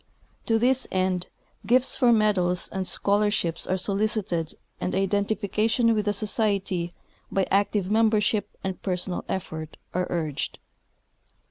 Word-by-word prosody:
To 225 - +3
this 255 +3 +2
end, 185 -1 0 0.4
gifts 255 +2 +3
for 245 -2 +4
medals 195 -5 +2
and 190 -1 -3
scholarships 200 -3 +1
are 185 - +1
solicited, 195 -4 -1 0.2
and 180 - -2
identification 210 +4 +1
with 210 -2 0
the 205 - +2
Society 200 -4 -1 0.4
by 195 -1 +1
active 200 0 +1
membership 215 -1 +2
and 190 -2 -4
personal 180 -1 -2
effort 160 -4 -5 0.2
is 180 - +2
suggested. 155 -5 -3
200 Hz, 120 wpm, -26 LUFS, 180-215 Hz, 0.4 s, for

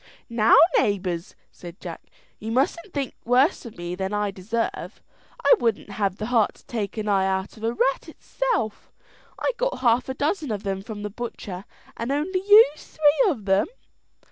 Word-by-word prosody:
"Now, 230 -1 +5 0.2
neighbours," 185 -4 -1 0.2
said 175 0 -11
Jack, 170 -3 -7 0.4
"you 220 +1 -5
mustn't 325 - 0
think 280 -5 -3
worse 255 +4 +2
of 225 - -12
me 175 0 -5
than 190 +2 -3
I 205 -1 0
deserve. 215 +4 -4 0.5
I - - +8
wouldn't 225 -3 -1
have 195 -2 -1
the 215 - -4
heart 230 -2 +2
to - - -22
take 220 -2 -4
an 215 -1 -3
eye 195 -2 +2
out 190 0 -2
of 220 - -13
a 225 - +1
rat 265 +6 0
itself; 415 - -3 0.5
I - - 0
got - - -1
half 245 +1 +2
a 260 - -3
dozen 300 +1 -1
of 205 -2 -3
them 195 -1 -2
from 205 0 -7
the 210 - -4
butcher, 200 -4 -7 0.3
and 230 +3 -3
only 320 +7 0
used 415 -8 +6
three 310 +9 +4
of 235 - -3
them." 195 0 +3
225 Hz, 180 wpm, -24 LUFS, 200-275 Hz, 0.5 s, I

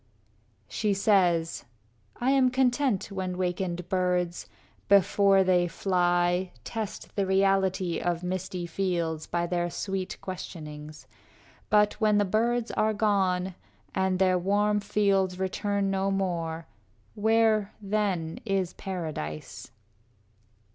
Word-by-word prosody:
IV - - -17
She 210 -2 +1
says, 180 -5 +2 0.5
"I 255 +2 +2
am 265 -2 +4
content 250 -4 +1
when 185 -2 -3
wakened 180 -1 -2
birds, 180 -2 0 0.4
Before 195 0 +5
they 180 -1 +3
fly, 175 0 +1
test 220 -3 -6
the 200 -2 0
reality 190 -2 +2
Of 175 0 -2
misty 185 0 -3
fields, 170 -3 -2
by 170 0 -1
their 175 0 -1
sweet 190 +1 -4
questionings; 155 -5 -8 0.6
But 210 0 +3
when 210 -1 +4
the 205 - +3
birds 230 +4 0
are 215 0 +1
gone, 190 -3 +1 0.4
and 190 -1 +1
their 185 -1 +3
warm 205 +3 +2
fields 200 -2 +1
Return 195 +1 -1
no 195 0 0
more, 170 -4 -2 0.5
where, 220 -1 +2
then, 195 -6 -1
is 195 -4 -1
paradise?" 155 - -6
190 Hz, 115 wpm, -27 LUFS, 175-205 Hz, 0.6 s, Before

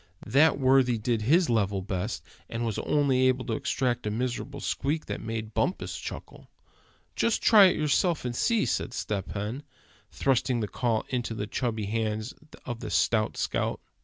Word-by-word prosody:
That 140 +8 +4
worthy 130 -2 +4
did 110 +1 -1
his 160 +11 +4
level 100 -4 0
best, 100 +3 -3 0.3
and 115 +1 -3
was 110 -3 -2
only 135 -3 +2
able 130 0 +1
to - - -2
extract 130 -5 -1
a - - +1
miserable 125 +5 -3
squeak 150 +3 -2
that - - -5
made 110 -1 -5
Bumpus 180 - -1
chuckle. - - -9 0.7
"Just 230 - +1
try 210 -3 +8
it 185 - +4
yourself, 155 +1 +1
and 120 -1 -2
see," 230 - +2
said 120 - -2
Step 100 -6 -3
Hen, 105 +7 -4 0.5
thrusting 130 -2 +1
the 105 - -1
call 115 +2 -1
into 120 -3 -2
the 105 - -3
chubby 110 -1 -2
hands 110 +2 -2 0.3
of 120 -2 -5
the - - -6
stout 110 -2 +1
scout. - - -1
120 Hz, 165 wpm, -27 LUFS, 110-135 Hz, 0.7 s, try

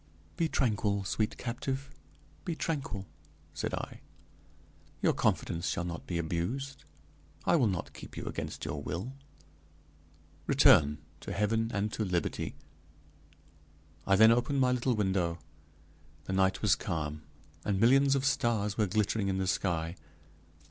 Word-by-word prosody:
"Be 165 -1 +1
tranquil, 105 -7 +1
sweet 105 +2 -1
captive, 135 +3 -3 0.5
be 170 -4 -2
tranquil," 140 -13 -3 0.5
said - - -3
I; - - -6 1.0
"your - - +3
confidence 85 +3 0
shall 90 - -1
not 85 -2 -6
be 85 - -1
abused. 90 +12 -3 0.6
I - - +4
will 130 -8 +4
not 95 -4 -3
keep - - -10
you - - -5
against - - -4
your - - -3
will. 95 - -4 1.3
Return 75 0 +6 0.2
to - - -7
heaven 110 +2 +1
and 105 0 -1
to 110 - -1
liberty." 90 -4 -1 1.5
I 95 - +5
then 110 +3 +8
opened 120 +4 +2
my 130 -1 +4
little 125 0 +1
window. 95 -5 +1 0.9
The 95 - -4
night 95 0 +2
was - - +5
calm, 75 -1 -2 0.4
and 100 -2 0
millions 135 +5 +5
of 135 0 0
stars 115 -6 +1
were 105 - +3
glittering 105 +1 +1
in 95 -1 0
the 95 - 0
sky. 85 -3 0
105 Hz, 135 wpm, -31 LUFS, 95-125 Hz, 1.5 s, then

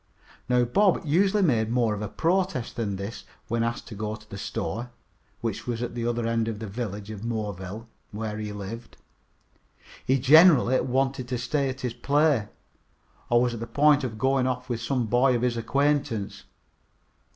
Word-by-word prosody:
Now 125 0 +4
Bob 190 - +2
usually 190 +7 +3
made 115 -9 +2
more 115 -2 +1
of 105 - -5
a 105 - -2
protest 175 - -1
than 105 -4 -2
this 100 +4 -6 0.3
when 115 0 0
asked 115 0 -2
to - - -8
go 105 +1 -4
to 105 0 -16
the 100 - -9
store, 120 +5 -4 0.5
which 115 -1 -4
was 120 0 -2
at 120 - -4
the 120 -1 -2
other 120 -1 -1
end 115 -1 0
of 115 -2 -3
the 110 - -6
village 105 -1 -5
of 105 -2 -7
Moreville, 105 -2 -4 0.2
where 105 0 -5
he 105 -1 -4
lived. 105 +3 -8 1.1
He 130 - +2
generally 140 -1 +6
wanted 130 0 -1
to 125 0 -2
stay 135 +3 0
at 130 +1 -6
his 125 -2 -2
play, 145 -5 +2 0.8
or 120 0 +4
was 120 -1 0
on 115 - -5
the 115 - -5
point 145 +1 +4
of 115 -4 -4
going 130 +1 +2
off 125 0 -3
with 115 -2 -2
some 125 +1 0
boy 125 +3 +3
of 120 - -1
his 125 -1 +1
acquaintance. 135 -3 -1
120 Hz, 185 wpm, -26 LUFS, 110-135 Hz, 1.1 s, generally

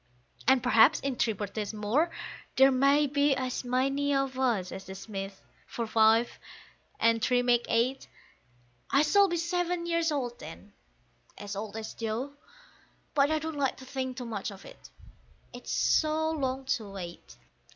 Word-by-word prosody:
And 260 -1 +4
perhaps 250 +4 +5
in 275 -2 -2
three 230 -2 +1
birthdays 205 +1 -5
more 225 +11 +1 0.5
there 270 +1 +6
may 275 +3 +4
be 285 0 +2
as 255 -1 -3
many 275 +3 0
of 270 -1 -1
us 225 -9 +1
as 190 0 -8
the 190 - -8
Smiths, 195 -1 -7 0.3
for 235 - -4
five 225 +1 +3 0.6
and 230 0 +3
three 245 +1 +2
make 240 -1 +2
eight; 245 +4 0 0.8
I 280 +1 +4
shall 400 +6 +5
be 345 -2 -1
seven 350 0 -1
years 335 -1 +1
old 245 -5 -3
then - - -11 0.6
(as 205 0 -6
old 215 +1 -5
as 220 0 -6
Joe), 230 +5 -4 0.8
but 280 0 +3
I 315 - +2
don't 315 0 -4
like 270 -2 0
to 260 - -11
think 260 -1 -4
too 250 - -5
much 220 -4 -4
of 195 -1 -12
it, - - -14 0.6
it's - - -7
so 315 0 +2
long 265 -3 -2
to 220 -5 -2
wait. 180 -3 -9
255 Hz, 160 wpm, -29 LUFS, 220-285 Hz, 0.8 s, there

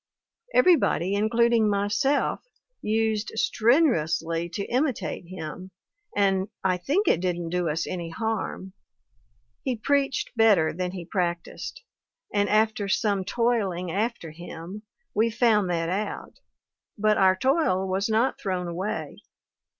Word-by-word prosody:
Everybody, 320 - +4
including 225 +1 +3
myself, 205 +8 +1 0.4
used 220 0 0
strenu 245 - +3
ously 165 +2 -2
to 200 +4 -4
imitate 245 - -1
him, 185 +1 -7 0.5
and 195 -1 +2 0.2
I 185 -1 +2
think 300 - 0
it - - +4
didn't 175 -2 -2
do 175 -1 0
us 160 +2 -1
any 175 -2 -4
harm; 215 -1 -3 0.9
he 260 -3 -1
preached 275 +3 0
better 205 -9 +4
than 180 +2 -2
he 180 -3 -6
practiced, 175 -1 -3 0.5
and 205 0 +2
after 215 0 +2
some 200 -1 +1
toiling 195 -5 0
after 205 -4 -2
him, 175 +4 -9 0.3
we 220 +2 +2
found 215 -4 +2
that 165 -1 -1
out, 200 +4 -4 0.6
but 215 0 +2
our 190 -1 +5
toil 225 - +1
was 190 +3 -1
not 225 +4 +1
thrown 185 -3 -2
away. 180 +5 -4
200 Hz, 125 wpm, -26 LUFS, 180-225 Hz, 0.9 s, our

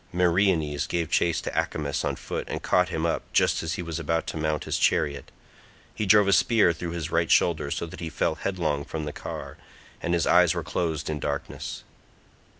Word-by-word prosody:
Meriones 85 -4 +2
gave 85 -1 -2
chase 85 -1 +2
to - - -4
Acamas 70 -2 -1
on - - -1
foot - - -5
and - - -4
caught 90 -2 +3
him 80 - -2
up 85 - 0
just - - +3
as 80 +1 -2
he 90 - -4
was 85 -1 -4
about 80 +1 -1
to - - -5
mount 75 -1 -1
his - - -2
chariot; 70 -1 +1 0.6
he 105 - -3
drove 105 0 +6
a 100 - +4
spear 105 -5 +4
through 85 +1 -5
his 85 -2 -4
right 85 0 +1
shoulder 80 -4 +3
so 85 - -2
that 80 - -10
he 85 - -4
fell 80 - 0
headlong 80 -5 -2
from 80 0 -5
the 75 - -5
car, - - -7 0.4
and 85 0 0
his 85 - +1
eyes 90 -1 +5
were 85 - -2
closed 80 -1 -2
in 75 -1 -2
darkness. 70 -1 -4
85 Hz, 205 wpm, -26 LUFS, 80-90 Hz, 0.6 s, drove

